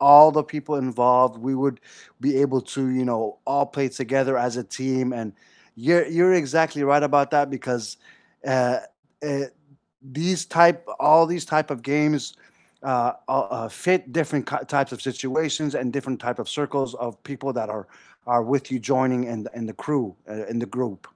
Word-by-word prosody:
all 145 +2 +11
the 150 - +1
people 150 0 -3
involved. 125 +1 +4
We 135 - 0
would 135 -4 0 0.4
be 145 - +1
able 130 -2 +1
to, 135 - -2 0.2
you 130 - 0
know, 115 -1 0 0.2
all 140 0 +2
play 135 -2 +1
together 135 +1 -1
as 125 0 -4
a - - -4
team, 130 -1 -2
and, 110 -4 -6 0.4
you're 170 +9 +3
you're 185 +1 +6
exactly 160 0 +1
right 145 +1 +4
about 140 -1 +4
that 145 -1 +4
because, 125 -4 -4 0.6
uh 125 -1 +2 0.5
uh, 140 0 -1 0.8
these 180 +1 0 0.2
type 170 0 +7 0.3
all 160 +2 +8
these 170 -3 -4
type 155 -1 +1
of 120 - -12
games, 150 -1 +2 0.6
uh 125 -2 +1 0.2
uh 135 - -1
uh, 115 0 -5 0.2
fit 185 0 +3
different 150 -5 -1
ki - - -1 0.2
types 140 -2 +1
of - - -14
situations 145 +3 -2
and 125 -1 -2
different 130 -2 -3
type 125 - -3
of - - -6
circles 140 -4 -2
of 120 - -4
people 135 -1 -6
that 110 - -4
are 105 -2 -7 0.4
are 120 -1 +2
with 140 -1 -1
you 130 - -2
joining 130 -1 +2
and 110 -2 -5 0.2
and 115 - -5
the - - -21
crew, 145 -5 0 0.2
uh, 110 0 -8
and 115 0 -3
the - - -3
group. 115 -8 -4
135 Hz, 180 wpm, -23 LUFS, 125-150 Hz, 0.8 s, all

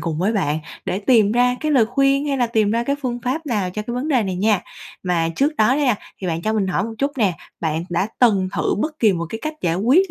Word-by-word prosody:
cùng 160 -1 -3
với 195 +6 +1
bạn 155 -8 0 0.3
để 190 - -1
tìm 210 -1 +3
ra 245 +1 +3
cái 310 -1 0
lời 245 -6 +4
khuyên, 275 +4 +2
hay 275 - 0
là 245 -2 +2
tìm 220 -3 +1
ra 230 +2 +1
cái 280 +3 0
phương 245 -2 -2
pháp 290 +6 -2
nào 205 -8 -1
cho 210 +4 -4
cái 240 +3 -5
vấn 255 +5 -2
đề 260 -6 +3
này 190 -3 -3
nha. 205 0 +2 0.4
Mà 175 -3 0
trước 295 +3 +1
đó 215 - +4
đó - - 0
nha, 255 -5 +3 0.3
thì 190 - -4
bạn 165 -1 -2
cho 215 - 0
mình 210 -3 0
hỏi 190 +1 0
một 225 - -5
chút 280 +1 0
nè, 205 -6 +3 0.3
bạn 160 0 -1
đã 175 +4 +1
từng 200 -6 +3
thử - - +1
bất 305 +6 -2
kỳ 220 -3 +4
một 170 -2 -3
cái 225 - -5
cách 310 0 -3
giải 165 -1 0
quyết 270 - +3
220 Hz, 280 wpm, -21 LUFS, 185-260 Hz, 0.4 s, lời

